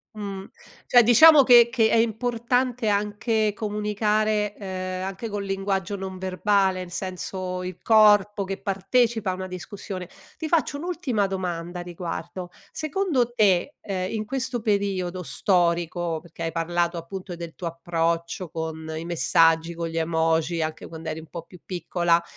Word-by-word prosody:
Mhmm, 200 -2 -6 0.4
cioè 245 - +7
diciamo 285 +7 +8
che 240 -2 +7
che 225 -3 +3
è - - +3
importante 235 +2 0
anche 210 +1 +1
comunicare, 210 0 0
ehm, 185 -2 -5
anche 195 +4 -5
col 205 -2 -4
linguaggio 195 0 -2
non 190 -1 -6
verbale 190 0 +1
nel 180 -1 -8
senso 185 0 -4
il 180 -1 -6
corpo 210 -2 +5
che 195 0 -5
partecipa 215 +2 +1
a - - -2
una 185 0 -5
discussione. 185 0 -7 0.3
Ti 320 - -4
faccio 310 -3 +1
un'ultima 300 - -1
domanda 180 -2 -4
a - - -4
riguardo, 175 +1 -6 0.2
secondo 310 -7 0
te, 205 +3 +2
ehm, 185 -2 -3
in 215 -1 -3
questo 255 0 -3
periodo 195 -4 -1
storico, 175 -2 0
perché 170 -1 -9
hai 165 - -1
parlato 170 +1 -1
appunto 180 +2 -7
del 170 -1 -8
tuo 180 - -7
approccio 170 +1 -2
con 160 -1 -5
i 160 +1 -5
messaggi, 165 +1 +3
con 170 0 -4
gli 165 0 -5
emoji, 165 0 +1
anche 155 0 -4
quand'eri 160 -1 -6
un 160 - -14
po' 170 - -7
più 175 +2 -16
piccola 175 -2 +1
190 Hz, 150 wpm, -25 LUFS, 170-215 Hz, 0.4 s, diciamo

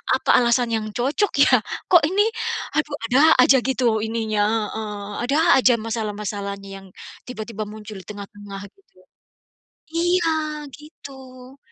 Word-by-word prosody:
Apa - - +2
alasan 240 0 +2
yang 220 -1 -1
cocok 290 +11 0
ya? - - +5 0.3
Kok 345 -4 +7
ini, 410 +2 +3 0.5
aduh 300 -1 0
ada 255 +3 +3 0.2
aja 265 +1 +6
gitu 245 -4 +1
ininya, 220 -2 -1 0.2
heeh, 210 -2 -6 0.2
ada 280 +3 +1 0.2
aja 255 -1 +5
masalah-masalahnya 205 -3 -5
yang - - -15 0.4
tiba-tiba 220 -3 -6
muncul 215 0 -10
di - - -12
tengah-tengah 205 -1 -9
gitu. 395 - -29 0.9
Iya 350 0 +1 0.4
gitu. 265 -3 -13
230 Hz, 125 wpm, -22 LUFS, 210-270 Hz, 0.9 s, Kok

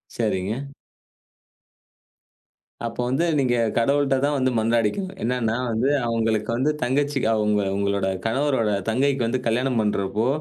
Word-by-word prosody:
சரிங்க. 110 +4 -2 2.2
அப்ப 115 - -5
வந்து 135 +7 +1
நீங்க 130 -3 +2 0.2
கடவுள்ட்டதான் 140 +3 +2
வந்து 130 -1 +1
மன்றாடிக்கணும். 115 - 0
என்னன்னா 115 -2 0 0.2
வந்து 115 +5 +1 0.2
அவங்களுக்கு 115 -2 0
வந்து 135 +5 +1
தங்கச்சிகா 135 -1 +1
உங்க 105 -1 +2 0.2
உங்களோட 100 -1 0 0.2
கணவரோட 125 -2 +1 0.2
தங்கைக்கு 135 +3 +1
வந்து 130 +3 -1
கல்யாணம் 125 +1 +1
பண்றப்போ, 105 +1 0
120 Hz, 110 wpm, -23 LUFS, 110-135 Hz, 2.2 s, நீங்க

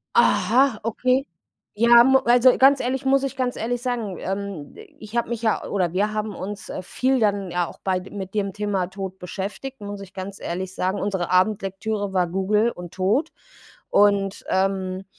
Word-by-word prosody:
Aha, 255 -2 +4
okay. 255 +4 +1 0.5
Ja 235 +2 +7
mu 265 +1 +5
also, 245 +2 +5
ganz 275 +1 +6
ehrlich, 265 +2 -2
muss 270 0 +4
ich 275 0 -3
ganz 255 -1 -1
ehrlich 240 +2 -3
sagen. 235 -7 -2
Ähm, 195 -5 -5 0.3
ich 215 +1 -10
habe 235 - 0
mich 235 -1 -4
ja 220 - +1
oder 180 -4 -1
wir 205 +3 +1
haben 215 -1 -3
uns, 200 +2 -7
äh, - - -5
viel 260 +8 0
dann 200 -4 0
ja 175 0 0
auch - - -11
bei 185 -1 +1
mit 190 0 -8
dem 200 -2 -1
Thema 200 -3 -1
Tod 190 0 -7
beschäftigt, 205 +9 -6
muss 205 0 -6
ich 195 -2 -11
ganz 195 +1 -7
ehrlich 185 +2 -4
sagen. 185 +2 -1
Unsere 190 -4 -2
Abendlektüre 195 +1 0
war 180 -2 +2
Google 205 +6 +1
und 175 -4 -10
Tod 215 - +1 0.6
und, 200 -1 +2
ähm, 190 -1 0
205 Hz, 180 wpm, -23 LUFS, 190-235 Hz, 0.6 s, Ja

